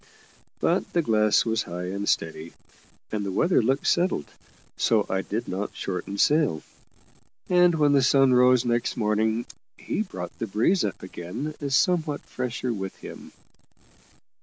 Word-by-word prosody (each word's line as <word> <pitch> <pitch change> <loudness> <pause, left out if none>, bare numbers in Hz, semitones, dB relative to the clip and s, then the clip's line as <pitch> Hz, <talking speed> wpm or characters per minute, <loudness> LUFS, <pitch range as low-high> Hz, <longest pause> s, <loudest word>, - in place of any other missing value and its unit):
But - - 0
the 170 - +2
glass 110 -4 +3
was 115 -1 0
high 90 +1 -5
and 100 +1 -3
steady, 80 0 -2 0.6
and 105 -1 -2
the 100 - -3
weather 170 - +2
looked 135 +5 0
settled, 175 - +1 0.5
so 110 -3 +2
I 95 0 -1
did 110 +4 -4
not 95 +3 -4
shorten 95 +1 -4
sail; 145 - +2 0.9
and 180 -1 +4
when 150 -2 +3
the 140 -1 +4
sun 135 0 +4
rose 125 0 +5
next 120 0 0
morning 110 +1 0 0.3
he - - -3
brought - - -7
the 115 - -3
breeze 115 - +2
up 100 - -4
again 95 - -6 0.2
somewhat 155 +2 +1
fresher 125 -1 -4
with 95 -3 -5
him. - - -11
115 Hz, 145 wpm, -25 LUFS, 100-140 Hz, 0.9 s, rose